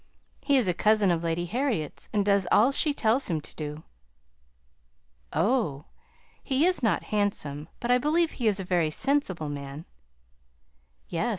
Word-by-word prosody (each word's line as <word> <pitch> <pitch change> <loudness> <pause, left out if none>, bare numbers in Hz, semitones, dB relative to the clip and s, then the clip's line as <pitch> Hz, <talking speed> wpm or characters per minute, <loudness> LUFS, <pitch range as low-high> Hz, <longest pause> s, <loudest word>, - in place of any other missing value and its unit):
He 280 -2 +3
is 245 -7 +2
a 180 - +2
cousin 210 +1 +3
of 170 -1 -1
Lady 165 +1 -1
Harriet's, 225 - -3
and 205 -2 0
does 200 -3 +2
all 235 +6 +5
she 295 +2 +2
tells 250 -2 +1
him 165 -3 0
to 150 - -12
do." 150 0 -6 1.5
"Oh! 165 - 0 0.6
he 270 +3 +1
is 365 -3 +2
not 220 -7 +1
handsome; 155 -8 -1
but 240 - -1
I 250 - +5
believe 315 +5 +1
he 240 - -2
is 205 -2 +2
a - - -3
very 175 -3 +1
sensible 195 - 0
man." 140 +2 -7 1.2
"Yes! - - -1
200 Hz, 160 wpm, -27 LUFS, 160-255 Hz, 1.5 s, all